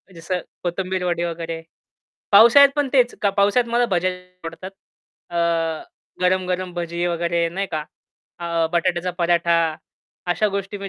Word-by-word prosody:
जसं 175 +2 -3 0.2
कोथिंबीर 185 +1 -2
वडी 175 -1 -1
वगैरे. 165 -1 -4 0.7
पावसाळ्यात 235 +7 +8
पण 290 -2 +1
तेच. 250 -3 +3
का 200 - +3
पावसाळ्यात 205 +5 +2
मला 240 +1 +3
भज्या 185 -3 +1 0.3
आवडतात. 165 +3 -7 0.6
अ, 175 - -5 0.8
गरम-गरम 185 0 0
भजी 170 0 -2
वगैरे, 170 0 0
नाही 195 +4 -3
का? 155 -1 -1 0.6
अ, 170 -1 0
बटाट्याचा 175 +1 0
पराठा. 170 -1 +2 0.7
अशा 195 +5 +2
गोष्टी 200 0 -4
मी 195 0 -6
180 Hz, 130 wpm, -21 LUFS, 170-200 Hz, 0.8 s, पावसाळ्यात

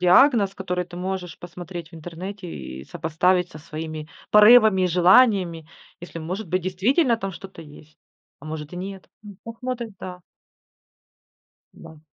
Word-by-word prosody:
диагноз, 200 +2 +5
который 180 -2 -3
ты 175 0 -12
можешь 185 -1 -5
посмотреть 175 -1 -9
в - - -15
интернете 175 +4 -8
и 65 - -8
сопоставить 180 - 0
со 155 - -11
своими 155 0 -7 0.2
порывами 210 -2 +7
и - - +3
желаниями. 180 -2 +4 0.3
Если, 175 -1 -8
может 180 +5 -5
быть, 185 +2 0
действительно 230 - +2
там 195 -3 -5
что-то 190 0 -11
есть, 155 0 -16 0.4
а - - -14
может 155 0 -6
и - - -7
нет. 190 +1 -7
Ну, 205 -2 -12
посмотришь 235 -1 -5
Да. 180 -1 -8 1.5
Да. 160 -2 -14
180 Hz, 145 wpm, -23 LUFS, 165-200 Hz, 1.5 s, порывами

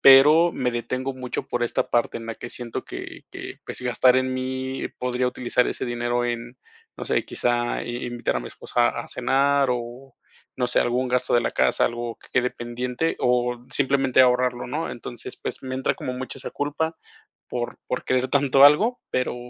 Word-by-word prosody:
pero 150 +6 +8
me 125 -1 -1
detengo 130 +3 -2
mucho 125 -1 -4
por 120 - -2
esta 120 - 0
parte 120 -1 +1
en 115 - -9
la 115 - -4
que 120 - -8
siento 120 -2 -5
que - - -8
que - - -8
pues, - - -3
gastar 125 +1 +4
en 130 0 +1
mí, 130 +1 -3
podría 125 0 0
utilizar 125 0 +1
ese - - -3
dinero 120 0 -1
en, 120 +1 -4 0.4
no - - -6
sé, - - +1
quizá 120 0 0
i 120 +1 -4
invitar 120 -1 -2
a - - -1
mi - - -7
esposa - - +1
a - - -4
cenar 140 0 +2
o, 125 +2 -5 0.4
no 125 - +1
sé, 125 - +4
algún 125 +1 +1
gasto 125 0 0
de 120 - +5
la - - 0
casa, - - +3
algo 120 -1 -4
que - - -18
quede 125 -1 +2
pendiente 125 +6 -3
o 125 0 +2
simplemente 135 -2 +3
ahorrarlo, 125 -1 +3
¿no? 150 +6 -3
Entonces, 120 0 -8
pues, - - -4
me 130 0 -4
entra 130 0 0
como 130 - -4
mucho 130 0 -6
esa - - -6
culpa 160 +3 -2 0.5
por 120 -1 -3
por 125 - -2
querer 130 0 +1
tanto 140 -1 +4
algo, 215 - +5
pero 125 -1 0
125 Hz, 190 wpm, -24 LUFS, 120-130 Hz, 0.5 s, pero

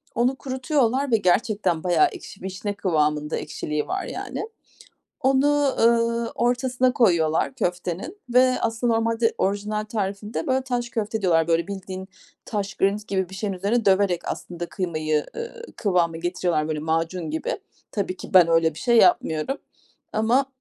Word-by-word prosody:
Onu 245 +3 +2
kurutuyorlar 265 0 0
ve 225 - +5
gerçekten 185 -3 +1
bayağı 175 -4 +4
ekşi, - - -10
vişne 190 +2 -4
kıvamında 150 -5 0
ekşiliği 150 0 -3
var, 380 0 -2
yani. 435 - -5 0.7
Onu, 265 +1 +3 0.4
ııı, 235 0 +2
ortasına 250 +1 +1
koyuyorlar 170 -4 +2
köftenin 180 - -3
ve 255 0 +5
aslında 230 +1 0
normalde 230 0 +1
orijinal 210 +2 -1
tarifinde, 210 +5 -3
böyle, 265 -1 +1
taş 245 -2 -2
köfte 220 -1 -2
diyorlar. 165 -3 +3
Böyle, 165 0 +2
bildiğin 190 -1 -6 0.4
taş, 200 -2 -3
granit 200 +2 0
gibi 190 -2 0
bir 190 - -10
şeyin 200 +1 -2
üzerinde 200 +5 0
döverek 190 -3 +3
aslında 175 -1 -5
kıymayı, 155 -5 -1
ııı, 470 0 -6
kıvama 175 -5 +1
getiriyorlar, 170 -2 -1
böyle, 155 -1 -2
macun 165 +1 -1
gibi. 160 +1 -3 0.3
Tabii 195 -3 -2
ki - - -9
ben 175 -2 +8
öyle 165 -1 +3
bir - - -10
şey 240 -2 +2
yapmıyorum. 230 - +3 0.5
Ama 235 +5 +2
200 Hz, 145 wpm, -24 LUFS, 175-235 Hz, 0.7 s, ben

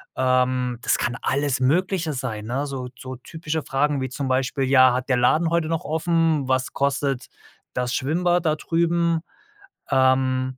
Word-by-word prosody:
Ähm, 130 -1 +1
das - - +1
kann 120 - -2
alles 140 -1 0
Mögliche 165 +4 +1
sein, 115 -6 -4
ne? 135 +6 -2
So 130 -2 -5
so 130 0 -7
typische 160 +4 -5
Fragen 140 +1 0
,wie 130 - -3
zum 140 +1 -4
Beispiel, 130 +1 0
ja: 130 -1 +5
„Hat 130 0 -2
der 125 - +3
Laden 155 +7 +3
heute 170 -1 +1
noch 165 -1 -2
offen? 160 -2 +1
Was 130 0 0
kostet 140 -2 -1 0.5
das 125 -1 -2
Schwimmbad 175 +6 +1
da 155 -1 +2
drüben?“ 170 0 0 0.7
Ähm, 130 0 +2
135 Hz, 160 wpm, -23 LUFS, 130-160 Hz, 0.7 s, ja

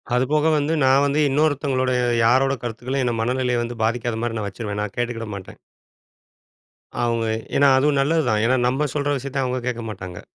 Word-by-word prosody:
அதுபோக 150 +5 +2
வந்து, 150 +2 0
நான் 135 +2 +4
வந்து 145 +1 +1
இன்னொருத்தவங்களோட 140 -3 +1 0.3
யாரோட 130 +3 +3
கருத்துகளையும் 120 +3 -3
என்ன 120 - 0
மனநிலையை 125 +1 0
வந்து 120 -1 -6
பாதிக்காத 115 0 -1
மாரி 115 -1 -2
நான் 105 - -3
வச்சுருவேன். 105 0 -5
நான் 105 -1 -5
கேட்டுக்கிட 120 -2 -3
மாட்டேன். 95 -2 -10 1.5
அவங்க 115 -1 0 0.3
ஏன்னா 140 0 +5
அதுவும் 145 +1 +2
நல்லது 160 +3 +2
தான். 105 -1 +1
ஏன்னா, 130 +2 +3
நம்ம 135 +4 0
சொல்ற 145 0 0
விஷயத்தை 135 +1 -3
அவங்க 125 0 -2
கேட்க 120 -2 -3
மாட்டாங்க! 95 -4 -7
125 Hz, 170 wpm, -22 LUFS, 115-140 Hz, 1.5 s, ஏன்னா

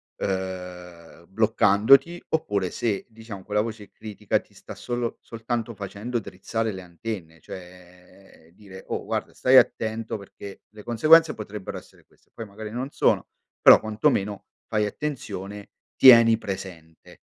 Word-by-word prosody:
ehm, 90 -3 -6
bloccandoti 110 - +3
oppure 100 - -1
se, 105 -5 -2
diciamo, 110 -3 -10
quella 105 +1 -1
voce 110 -2 -6
critica 110 -2 -3
ti - - -23
sta - - -11
solo 120 -1 -4
soltanto, 115 0 -4
facendo 105 +4 -4
drizzare 110 +3 -4
le 95 -2 -8
antenne, 85 -2 -8
cioè 90 -1 -14
dire: 95 -1 -13
“Oh, - - -3
guarda, - - -4
stai 130 +1 +4
attento 110 -2 +1
perché 100 0 -11
le 105 0 -14
conseguenze 155 +8 +5
potrebbero 105 -2 -7
essere - - -16
queste, - - -32
poi 115 - -7
magari 105 +1 -9
non 125 +4 -4
sono - - +1 0.3
però - - +9
quantomeno 105 -2 -1 0.2
fai 105 -1 0
attenzione, 105 -6 -6 0.3
tieni 115 -3 +8
presente, 90 -6 -9
105 Hz, 130 wpm, -24 LUFS, 95-115 Hz, 0.3 s, però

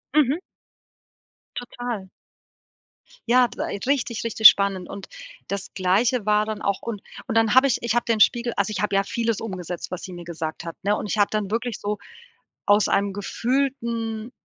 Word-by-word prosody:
Mhm. 300 +2 +3 1.2
Total. 245 -5 -5 1.2
Ja, 250 +1 +5
bei 200 - -3
richtig, 255 -5 0
richtig 220 -1 +9
spannend 195 -2 -1
und 200 - -8 0.4
das 200 -1 -4
Gleiche 205 +5 +2
war 210 0 +3
dann 215 -1 -5
auch 200 -1 -1
und 215 -4 -5 0.3
und 225 - -3
dann 225 -2 +3
habe 260 +2 +6
ich 250 - +2
ich 235 -1 0
habe 240 - +1
den 230 -2 +2
Spiegel 240 +1 +3
also, 200 +1 +1
ich 210 - -2
habe 210 -1 0
ja 195 - +3
vieles 230 +1 -1
umgesetzt, 180 -5 -5
was 185 - -4
sie 185 - -8
mir 175 0 -8
gesagt 160 -1 -5
hat, 165 - -6
ne? 205 +2 +2
Und - - -4
ich 210 - -2
habe 205 - +4
dann 210 -2 -2
wirklich 230 0 -2
so 205 0 -3 0.7
aus 205 0 +4
einem 200 0 +1
gefühlten 230 0 -2
215 Hz, 180 wpm, -24 LUFS, 200-235 Hz, 1.2 s, richtig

